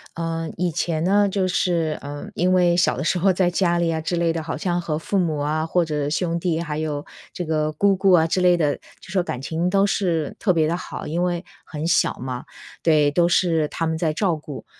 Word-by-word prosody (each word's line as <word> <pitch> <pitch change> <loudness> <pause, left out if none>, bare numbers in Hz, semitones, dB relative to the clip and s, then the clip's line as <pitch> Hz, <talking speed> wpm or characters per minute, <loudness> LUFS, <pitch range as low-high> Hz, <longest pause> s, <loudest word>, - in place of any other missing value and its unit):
呃， 165 -1 -3
以 180 0 0
前 160 -1 -1
呢， 200 +2 +3
就 190 -1 0
是， 170 -4 0
呃， 145 0 -7
因 180 +1 +2
为 180 -2 +4
小 175 - +2
的 - - -2
时 180 - +1
候 190 +2 +3
在 180 -1 +2
家 175 -1 +1
里 170 -1 +1
啊 160 -1 -1
之 175 +2 -2
类 165 -1 +1
的， 165 -1 -3
好 160 - -4
像 175 -1 -1
和 155 -2 -2
父 200 +5 -2
母 165 -5 +1
啊， 155 +2 -1
或 170 +1 +1
者 150 -2 -2
兄 170 +2 -1
弟 170 -1 -1
还 155 -3 -3
有 150 -2 -3 0.3
这 180 - -5
个 155 -1 0
姑 195 +6 +2
姑 190 0 +3
啊 165 -3 +5
之 185 +3 0
类 180 -1 +5
的， 150 -4 +1
就 - - -19
说 190 -2 +1
感 125 -7 -5
情 165 +5 -1
都 195 +1 +3
是 170 -7 -1
特 195 - +1
别 160 -3 +2
地 170 - 0
好， 180 - -7
因 170 +3 -1
为 175 0 -1 0.2
很 155 +1 -4
小 170 - +3
嘛， 125 -1 -5 0.4
对， 155 -3 +4
都 170 +4 +2
是 165 -4 +2
他 165 - -2
们 160 0 -1
在 160 -2 0
照 170 +1 0
顾。 150 -2 -9
170 Hz, 255 characters per minute, -22 LUFS, 155-180 Hz, 0.4 s, 啊